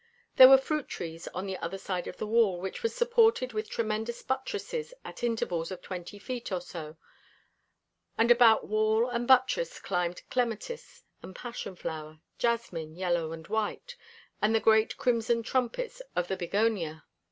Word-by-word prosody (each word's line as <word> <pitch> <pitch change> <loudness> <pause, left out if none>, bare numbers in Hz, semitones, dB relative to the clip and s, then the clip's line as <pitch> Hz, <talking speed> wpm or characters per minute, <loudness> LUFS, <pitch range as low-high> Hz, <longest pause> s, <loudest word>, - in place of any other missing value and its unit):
There 260 - +12
were 270 - +10
fruit 300 +2 -2
trees 165 0 -6
on 185 +2 -5
the 190 -1 -4
other 170 +3 -4
side 185 -2 -4
of - - -7
the - - -3
wall, 215 -4 +3
which 190 - -5
was 460 -1 -1
supported 460 - +3
with 215 0 -3
tremendous 225 +1 -2
buttresses 420 - -3
at - - -9
intervals 180 -8 -1
of 185 -2 -8
twenty 185 +2 -7
feet 245 +2 -6
or 185 - 0
so, 160 -3 -8 1.2
and 230 +1 +4
about 235 -2 +6
wall 215 +2 +2
and 240 0 -2
buttresses 260 - +3
climbed 180 -2 -2
clematis 250 - -3 0.2
and 185 - -10
passion 235 -6 -6
flower, 155 -2 -6 0.2
jasmine, 180 -10 -1
yellow 175 -3 -1
and 160 -1 -8
white, 220 - -3 0.5
and 215 +2 +3
the - - +4
great 220 0 +3
crimson 230 -1 +1
trumpets 460 - -2
of 175 0 -1
the 190 - 0
bignonia. 175 -4 -1
220 Hz, 160 wpm, -29 LUFS, 180-245 Hz, 1.2 s, There